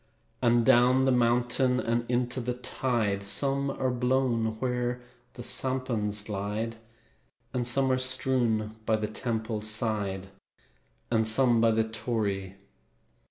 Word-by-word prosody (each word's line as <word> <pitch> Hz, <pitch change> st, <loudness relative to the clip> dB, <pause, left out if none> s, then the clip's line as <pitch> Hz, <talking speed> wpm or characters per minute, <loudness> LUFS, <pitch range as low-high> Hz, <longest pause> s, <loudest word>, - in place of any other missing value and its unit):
And 120 Hz, -1 st, +3 dB
down 125 Hz, +3 st, +4 dB
the 135 Hz, -, +3 dB
mountain 125 Hz, +1 st, +2 dB
And 120 Hz, 0 st, -2 dB
into 125 Hz, +1 st, -1 dB
the 120 Hz, +1 st, -3 dB
tide, 120 Hz, -5 st, -2 dB
Some 140 Hz, +6 st, +2 dB
are 130 Hz, -1 st, -2 dB
blown 125 Hz, -3 st, 0 dB
where 125 Hz, -1 st, -2 dB, 0.4 s
the 120 Hz, -, -8 dB
sampans 120 Hz, -6 st, +1 dB
glide, 105 Hz, +2 st, -4 dB, 0.8 s
And 120 Hz, -1 st, -1 dB
some 130 Hz, +2 st, +3 dB
are 130 Hz, -, +1 dB
strewn 120 Hz, -4 st, 0 dB
by 110 Hz, -, +3 dB
the 110 Hz, 0 st, -2 dB
temple's 110 Hz, -1 st, -3 dB
side, 105 Hz, -4 st, -1 dB, 0.8 s
And 110 Hz, -1 st, +2 dB
some 120 Hz, 0 st, +4 dB
by 115 Hz, -, +4 dB
the 110 Hz, 0 st, +2 dB
torii. 105 Hz, -4 st, -3 dB
120 Hz, 125 wpm, -27 LUFS, 110-125 Hz, 0.8 s, down